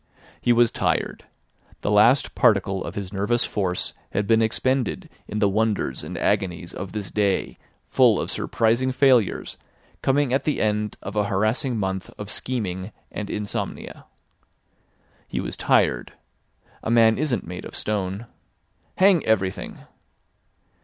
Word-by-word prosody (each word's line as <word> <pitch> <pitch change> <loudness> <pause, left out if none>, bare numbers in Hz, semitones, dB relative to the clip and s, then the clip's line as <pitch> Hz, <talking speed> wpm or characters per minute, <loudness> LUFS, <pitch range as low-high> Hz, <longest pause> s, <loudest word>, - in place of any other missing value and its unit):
He 120 - +2
was 120 -1 +4
tired. - - -1 0.6
The 105 - -1
last 110 +6 +4
particle 100 -6 +2
of - - -7
his 100 -1 -5
nervous 105 +5 +1
force 95 -4 -2 0.2
had 100 - 0
been 115 +2 +4
expended 130 +2 0 0.2
in 105 - -4
the 105 - +3
wonders 105 -8 0
and - - -6
agonies 95 -4 -1
of 95 +1 -6
this 105 -4 -5
day 100 -2 0 0.3
full - - +4
of - - -3
surprising 115 +3 +1
failures 130 -5 +2 0.4
coming 135 -1 +2
at 135 - +2
the 150 - 0
end 105 -1 0
of 100 +2 -6
a 105 -1 +2
harassing 110 +5 0
month 95 -2 -2
of 105 0 -4
scheming 100 -6 -2 0.2
and 105 - -5
insomnia. 105 -1 -5 1.2
He - - -3
was - - -4
tired. - - +1 0.7
A - - -4
man 115 0 +5
isn't 135 - 0
made 90 +1 -7
of - - -9
stone. 100 +1 -2 0.7
Hang 190 -3 +5
everything! 95 -4 -1
105 Hz, 140 wpm, -24 LUFS, 95-120 Hz, 1.2 s, man